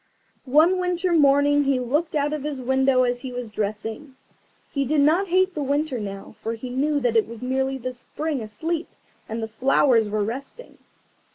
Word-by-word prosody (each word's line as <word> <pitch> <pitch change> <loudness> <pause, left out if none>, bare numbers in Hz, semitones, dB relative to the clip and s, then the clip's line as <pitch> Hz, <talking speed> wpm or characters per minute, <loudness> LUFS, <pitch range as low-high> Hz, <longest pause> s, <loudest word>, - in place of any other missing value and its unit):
One 325 +7 +5
winter 360 0 0
morning 290 -1 +4
he 270 -2 +2
looked 295 +7 -1
out 295 0 +1
of 305 - -3
his 290 -1 -4
window 265 0 +2
as 245 0 0
he 260 0 -7
was 245 -3 -6
dressing. 220 +6 -4 0.6
He 280 -2 0
did 290 +2 +2
not 330 +7 +3
hate 375 +1 +2
the 300 - -3
Winter 285 -1 -1
now, 195 -2 -7
for 225 +1 -3
he 245 +2 -7
knew 290 +3 +1
that 245 -4 0
it 225 - +3
was 230 +1 -9
merely 265 +1 0
the 255 0 -5
Spring 290 +3 -4
asleep, 315 +11 -3 0.4
and 225 +1 -3
that - - 0
the 220 - -14
flowers 240 -2 +3
were 210 0 0
resting. 270 - -7
265 Hz, 190 wpm, -24 LUFS, 240-300 Hz, 0.6 s, One